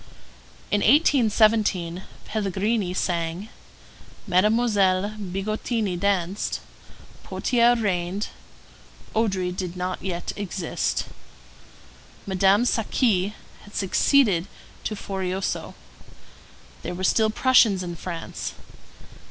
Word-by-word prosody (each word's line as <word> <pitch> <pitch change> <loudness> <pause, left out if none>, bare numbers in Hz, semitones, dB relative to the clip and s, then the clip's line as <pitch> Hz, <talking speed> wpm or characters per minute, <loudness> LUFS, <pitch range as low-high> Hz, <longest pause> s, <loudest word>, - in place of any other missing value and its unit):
In 205 - +2
1817 215 - +3 0.2
Pelligrini 205 -1 -1
sang; 175 +2 -2 0.8
Mademoiselle 200 -1 +3
Bigottini 205 +2 -2
danced; 195 0 -1 0.6
Potier 240 -1 +2
reigned; 195 -2 -1 0.9
Odry 190 -5 0
did 180 -1 -4
not 180 +1 -3
yet 175 -2 -3
exist. 190 -4 -2 1.2
Madame 195 +3 +3
Saqui 215 -4 +1 0.3
had 205 - -15
succeeded 195 -2 +3 0.4
to 215 - -2
Forioso. 190 -1 -3 1.1
There 175 - -5
were 185 - -5
still 220 +3 +3
Prussians 220 -5 +4
in 175 -1 -5
France. 110 - -6
195 Hz, 80 wpm, -24 LUFS, 180-215 Hz, 1.2 s, Prussians